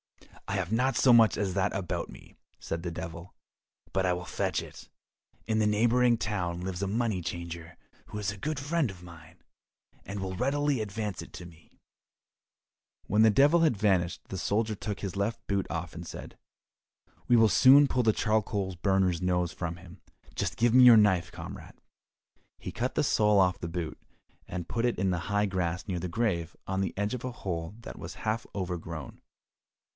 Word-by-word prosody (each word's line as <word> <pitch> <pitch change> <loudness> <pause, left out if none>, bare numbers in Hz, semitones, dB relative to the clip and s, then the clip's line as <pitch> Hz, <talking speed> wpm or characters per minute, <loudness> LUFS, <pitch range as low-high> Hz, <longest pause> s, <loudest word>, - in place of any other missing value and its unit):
"I - - -2
have 95 -1 -2
not 125 +1 +1
so 125 +1 +6
much 115 -2 +6
as 100 -3 -1
that 100 +1 0
about 95 -3 -3
me," - - -14 0.2
said 80 - -4
the 85 - -3
Devil, 85 +1 -7 0.6
"but 95 0 +1
I 90 - +2
will 90 0 -5
fetch - - -1
it. - - -12 0.6
In 110 -1 +1
the 105 - +3
neighbouring 120 +3 +3
town 90 -6 -2
lives 95 0 -4
a 100 - 0
money 110 -2 0
changer 85 0 -6 0.3
who - - -7
is 100 -2 -1
a 105 - -9
good 150 +7 -3
friend 145 - 0
of 90 -1 -14
mine, 85 -3 -14 0.6
and 100 +2 -6
will 95 -1 -4
readily 140 +2 0
advance 105 -2 -4
it - - -11
to 90 - -8
me." 85 -2 -17 1.3
When 105 +2 +2
the 110 - +7
Devil 145 +10 +5
had 155 -9 +3
vanished 95 -4 +1
the 95 - -5
soldier 110 +4 0
took 105 -2 -5
his 100 -1 -4
left 105 +4 -2
boot 100 -1 0
off, 80 -1 -4
and 85 - -8
said, - - -9 0.9
"We 120 - +5
will 115 -1 +6
soon 135 +8 +7
pull 125 -2 +1
the 110 - +4
charcoal 105 -3 0
burner's 95 -3 +2
nose 90 -1 0
for 85 -2 -3
him, 85 +2 -12 0.3
just - - -2
give 120 0 +3
me 130 0 +8
your 120 -2 +9
knife, 95 -5 +3
comrade." - - -9 0.8
He - - -7
cut 125 +2 -2
the - - +2
sole 105 -6 +3
off 90 -1 +3
the 85 - -4
boot, 85 -1 -5 0.5
and 90 -2 -5
put 115 +3 -2
it 120 -1 +1
in 95 0 +1
the 85 0 -3
high 105 0 +2
grass 90 -1 -2
near 90 -3 -2
the 90 +1 -4
grave 85 -5 -1
on 95 0 -1
the 95 - -3
edge 105 +3 -1
of 125 - -5
a 130 - -3
hole 90 -5 -5
that - - -9
was - - -7
half 110 +2 -1
over 90 -3 -2
grown. 80 -3 -8
100 Hz, 195 wpm, -29 LUFS, 90-115 Hz, 1.3 s, your